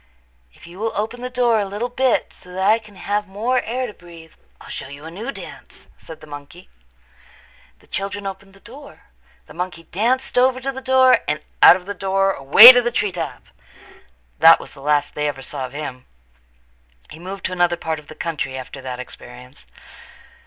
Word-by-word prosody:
"If -, -, -17 dB
you 175 Hz, +3 st, -13 dB
will 225 Hz, +1 st, -2 dB
open 225 Hz, +4 st, -4 dB
the 250 Hz, -, -4 dB
door 245 Hz, -3 st, +2 dB
a 205 Hz, -, -1 dB
little 205 Hz, +5 st, -4 dB
bit 250 Hz, +1 st, 0 dB
so 180 Hz, -, -14 dB
that 190 Hz, +1 st, -1 dB
I 220 Hz, +2 st, +4 dB
can 215 Hz, -2 st, -17 dB
have 205 Hz, +2 st, -3 dB
more 230 Hz, +6 st, -1 dB
air 255 Hz, +3 st, -3 dB
to 220 Hz, -, -8 dB
breathe 165 Hz, -3 st, -15 dB, 0.3 s
I'll -, -, -14 dB
show -, -, -7 dB
you 140 Hz, +2 st, -11 dB
a 160 Hz, -, -8 dB
new 220 Hz, +10 st, -6 dB
dance," -, -, -12 dB
said 160 Hz, -1 st, -12 dB
the -, -, -12 dB
monkey. 145 Hz, +4 st, -12 dB, 1.1 s
The -, -, -25 dB
children 200 Hz, +1 st, -5 dB
opened 195 Hz, 0 st, -8 dB
the -, -, -18 dB
door. 280 Hz, +4 st, -14 dB, 0.4 s
The -, -, -15 dB
monkey 175 Hz, -2 st, -5 dB
danced 240 Hz, +10 st, -1 dB
over 255 Hz, 0 st, +3 dB
to 270 Hz, +1 st, -3 dB
the 265 Hz, 0 st, -8 dB
door 260 Hz, -1 st, +4 dB
and 150 Hz, 0 st, -1 dB, 0.2 s
out -, -, +9 dB
of 180 Hz, -1 st, -8 dB
the 205 Hz, -, -5 dB
door 195 Hz, 0 st, 0 dB
away 190 Hz, -, +10 dB
to 245 Hz, -1 st, +3 dB
the 240 Hz, -, -1 dB
tree 210 Hz, -4 st, -1 dB
top. 170 Hz, -2 st, -6 dB, 1.0 s
That -, -, +8 dB
was -, -, -12 dB
the 135 Hz, -, -14 dB
last 145 Hz, 0 st, 0 dB
they 150 Hz, 0 st, -2 dB
ever 135 Hz, -2 st, -5 dB
saw 135 Hz, -2 st, -6 dB
of 125 Hz, -, -17 dB
him. 140 Hz, -4 st, -7 dB, 1.0 s
He 155 Hz, -, -11 dB
moved 190 Hz, +2 st, -8 dB
to -, -, -2 dB
another 175 Hz, -1 st, +1 dB
part 160 Hz, -2 st, -4 dB
of 150 Hz, -, -18 dB
the 155 Hz, -, -12 dB
country 150 Hz, -5 st, -4 dB
after 130 Hz, +1 st, -9 dB
that 130 Hz, -1 st, -6 dB
experience. 125 Hz, +1 st, -12 dB
190 Hz, 200 wpm, -20 LUFS, 155-230 Hz, 1.1 s, away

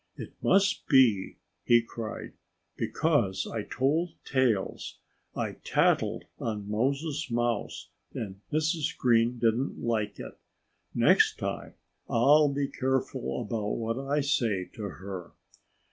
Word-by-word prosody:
"It -, -, -8 dB
must 195 Hz, +1 st, +2 dB
be," 125 Hz, -9 st, +4 dB, 0.3 s
he 120 Hz, -1 st, +5 dB
cried, 115 Hz, -1 st, -7 dB, 0.4 s
"because 120 Hz, -, 0 dB
I 115 Hz, -, -3 dB
told 155 Hz, +10 st, 0 dB
tales. 125 Hz, -7 st, 0 dB, 0.4 s
I -, -, -3 dB
tattled -, -, +2 dB, 0.2 s
on 105 Hz, -3 st, -3 dB
Moses 140 Hz, +7 st, -1 dB
Mouse; 120 Hz, -2 st, -2 dB, 0.2 s
and 100 Hz, -3 st, -6 dB
Mrs. 155 Hz, 0 st, 0 dB
Green 120 Hz, 0 st, +3 dB
didn't 115 Hz, +3 st, +1 dB
like 110 Hz, -3 st, -1 dB
it. -, -, -9 dB, 0.6 s
Next -, -, +4 dB
time -, -, -4 dB, 0.3 s
I'll 145 Hz, +6 st, +5 dB
be 140 Hz, 0 st, -1 dB
careful 130 Hz, -2 st, -2 dB
about 105 Hz, -1 st, -2 dB
what 115 Hz, +2 st, -2 dB
I 140 Hz, +2 st, 0 dB
say 115 Hz, -9 st, +1 dB
to -, -, -9 dB
her." 95 Hz, -3 st, -8 dB
120 Hz, 115 wpm, -28 LUFS, 110-140 Hz, 0.6 s, he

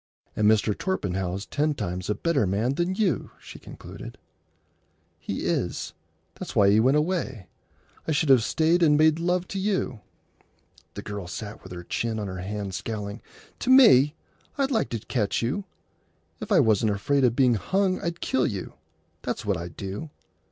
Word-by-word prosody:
"And 105 Hz, 0 st, +3 dB
Mr. 110 Hz, -1 st, +2 dB
Torpenhow's 95 Hz, -, -2 dB
ten 150 Hz, +1 st, 0 dB
times 90 Hz, -4 st, -4 dB
a 105 Hz, -, +1 dB
better 150 Hz, -, +1 dB
man 110 Hz, +8 st, 0 dB
than 175 Hz, +5 st, -1 dB
you," 190 Hz, -, 0 dB
she -, -, -12 dB
concluded. -, -, -10 dB, 1.0 s
"He -, -, -4 dB
is. -, -, -2 dB, 0.4 s
That's -, -, -8 dB
why 100 Hz, -1 st, +5 dB
he 105 Hz, -, +5 dB
went 130 Hz, +6 st, +4 dB
away. 150 Hz, -, -1 dB, 0.6 s
I -, -, 0 dB
should 150 Hz, 0 st, +1 dB
have 130 Hz, -4 st, +6 dB
stayed 165 Hz, +7 st, +2 dB
and 150 Hz, -3 st, +5 dB
made 155 Hz, +1 st, +4 dB
love 180 Hz, +1 st, 0 dB
to 195 Hz, -, -3 dB
you." 190 Hz, -, -1 dB, 1.0 s
The -, -, -6 dB
girl 100 Hz, -3 st, -6 dB
sat 105 Hz, +3 st, -7 dB
with 95 Hz, -, -12 dB
her 90 Hz, -1 st, -7 dB
chin 115 Hz, +5 st, -2 dB
on 105 Hz, -, -3 dB
her 95 Hz, -1 st, -5 dB
hand, 100 Hz, 0 st, -4 dB
scowling. 105 Hz, +1 st, -5 dB, 0.4 s
"To 250 Hz, -, -3 dB
me! 190 Hz, -, +7 dB, 0.4 s
I'd 275 Hz, -1 st, +1 dB
like 225 Hz, -4 st, +1 dB
to 115 Hz, -, -2 dB
catch 105 Hz, 0 st, -1 dB
you! 145 Hz, +12 st, -2 dB, 0.7 s
If -, -, -7 dB
I -, -, +6 dB
wasn't 110 Hz, -1 st, +2 dB
afraid 140 Hz, +7 st, +1 dB
o' 125 Hz, -, +6 dB
being 125 Hz, +1 st, +3 dB
hung 185 Hz, -, 0 dB
I'd 170 Hz, 0 st, -4 dB
kill 130 Hz, -1 st, +1 dB
you. 100 Hz, -3 st, -5 dB, 0.5 s
That's -, -, -4 dB
what -, -, +1 dB
I'd 85 Hz, -1 st, -7 dB
do. 100 Hz, +11 st, -5 dB
125 Hz, 175 wpm, -26 LUFS, 100-165 Hz, 1.0 s, me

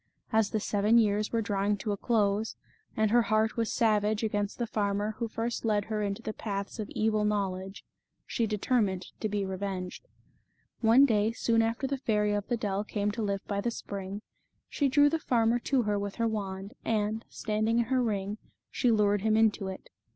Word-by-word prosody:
As 220 Hz, -2 st, +3 dB
the 215 Hz, -, -1 dB
seven 210 Hz, +2 st, +2 dB
years 210 Hz, -2 st, +2 dB
were 230 Hz, -1 st, 0 dB
drawing 200 Hz, 0 st, 0 dB
to 210 Hz, +1 st, -3 dB
a -, -, 0 dB
close, 210 Hz, 0 st, +1 dB, 0.4 s
and 215 Hz, -1 st, +2 dB
her 240 Hz, +1 st, +6 dB
heart 215 Hz, 0 st, +1 dB
was 230 Hz, -1 st, -1 dB
savage 215 Hz, -1 st, +2 dB
against 205 Hz, -2 st, -1 dB
the 240 Hz, -, -1 dB
farmer 205 Hz, -1 st, -1 dB
who 235 Hz, -, -1 dB
first 230 Hz, +2 st, -3 dB
led 210 Hz, -3 st, +1 dB
her 215 Hz, -1 st, -2 dB
into 200 Hz, +2 st, -3 dB
the 215 Hz, -, -3 dB
paths 200 Hz, +1 st, -4 dB
of 210 Hz, -, -4 dB
evil 215 Hz, -1 st, +1 dB
knowledge, 195 Hz, -2 st, -2 dB, 0.4 s
she 230 Hz, -, -1 dB
determined 205 Hz, -3 st, 0 dB
to 215 Hz, -, -1 dB
be 205 Hz, -1 st, -1 dB
revenged. 190 Hz, -1 st, -5 dB, 0.7 s
One 235 Hz, +4 st, +6 dB
day, 220 Hz, -3 st, +2 dB
soon 230 Hz, -1 st, +2 dB
after 230 Hz, +4 st, -1 dB
the 275 Hz, 0 st, -2 dB
Fairy 210 Hz, -4 st, +1 dB
of 205 Hz, 0 st, -2 dB
the 240 Hz, -, 0 dB
Dell 205 Hz, -3 st, -1 dB
came 210 Hz, -1 st, -1 dB
to 230 Hz, +2 st, -4 dB
live 200 Hz, -2 st, -2 dB
by 200 Hz, -1 st, -2 dB
the 235 Hz, -, 0 dB
spring, 200 Hz, -2 st, -6 dB, 0.4 s
she 285 Hz, -2 st, 0 dB
drew 290 Hz, +2 st, +5 dB
the 320 Hz, +2 st, +1 dB
farmer 235 Hz, -4 st, +2 dB
to 265 Hz, -3 st, +2 dB
her 210 Hz, -1 st, 0 dB
with 200 Hz, 0 st, -4 dB
her 230 Hz, -1 st, +1 dB
wand, 200 Hz, -1 st, -4 dB
and, 220 Hz, 0 st, 0 dB
standing 215 Hz, +1 st, 0 dB
in 235 Hz, -, +3 dB
her 255 Hz, +1 st, +1 dB
ring, 205 Hz, -2 st, -2 dB, 0.3 s
she 250 Hz, -, +1 dB
lured 205 Hz, -2 st, +3 dB
him 220 Hz, +1 st, +2 dB
into 220 Hz, -3 st, +2 dB
it. 190 Hz, 0 st, -8 dB
215 Hz, 195 wpm, -29 LUFS, 200-230 Hz, 0.7 s, her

